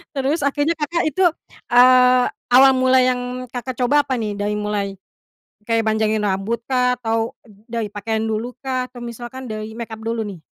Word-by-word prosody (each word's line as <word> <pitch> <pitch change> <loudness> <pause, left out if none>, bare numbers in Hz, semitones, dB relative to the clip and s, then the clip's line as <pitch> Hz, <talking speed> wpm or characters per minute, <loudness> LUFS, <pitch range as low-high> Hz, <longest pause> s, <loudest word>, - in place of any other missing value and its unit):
Terus, 275 +4 0
akhirnya 290 +3 +1
Kakak, 325 +3 -1
itu, 340 +6 0 0.5
eee, 250 0 +6 0.3
awal 265 +1 +8
mula 260 0 +4
yang 250 0 -2
Kakak 250 0 -5
coba 285 +3 +3
apa 260 - -1
nih? 210 -3 -3
Dari 205 +1 -1
mulai 205 -1 -2 0.7
kayak 225 -1 +2
panjangin 220 0 +1
rambut 200 +4 -1
kah, 250 -1 +1
atau 225 -1 -1
dari 220 +2 -6
pakaian 220 +2 -2
dulu 225 +3 -3
kah, 255 -1 -1
atau 245 - -12
misalkan 240 +2 -8
dari 215 0 -6
makeup 220 -1 -7
dulu, 225 0 -2
nih? 185 -6 -9
240 Hz, 165 wpm, -20 LUFS, 220-255 Hz, 0.7 s, awal